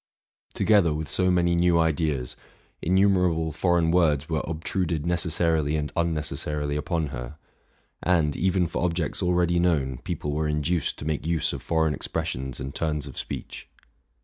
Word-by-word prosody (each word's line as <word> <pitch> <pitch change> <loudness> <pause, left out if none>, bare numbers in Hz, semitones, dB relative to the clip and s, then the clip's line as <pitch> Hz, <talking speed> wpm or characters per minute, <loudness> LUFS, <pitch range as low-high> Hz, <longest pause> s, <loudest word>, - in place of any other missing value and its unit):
Together 95 -8 +3
with 75 -2 -4
so 90 0 +2
many 85 -1 +3
new 85 0 +3
ideas, 75 -6 0 0.5
innumerable 90 -3 +2
foreign 85 +1 +2
words 75 -5 +2
were 80 -2 -1
obtruded 80 0 -2
necessarily 80 -3 +1
and 75 -2 -2
unnecessarily 75 -3 -1
upon 80 +1 -1
her; 60 +3 -7 0.6
and, 80 -5 +2
even 95 0 +1
for 85 - -3
objects 85 -1 -1
already 90 -1 +2
known, 70 -8 +1
people 75 - -4
were 75 +1 -1
induced 75 +2 0
to - - -7
make 80 0 -2
use 85 -1 +1
of - - -5
foreign 80 -2 +1
expressions 65 -7 -3
and 70 0 -5
turns 75 -3 -2
of 70 - -9
speech. - - -7
80 Hz, 150 wpm, -25 LUFS, 75-85 Hz, 0.6 s, Together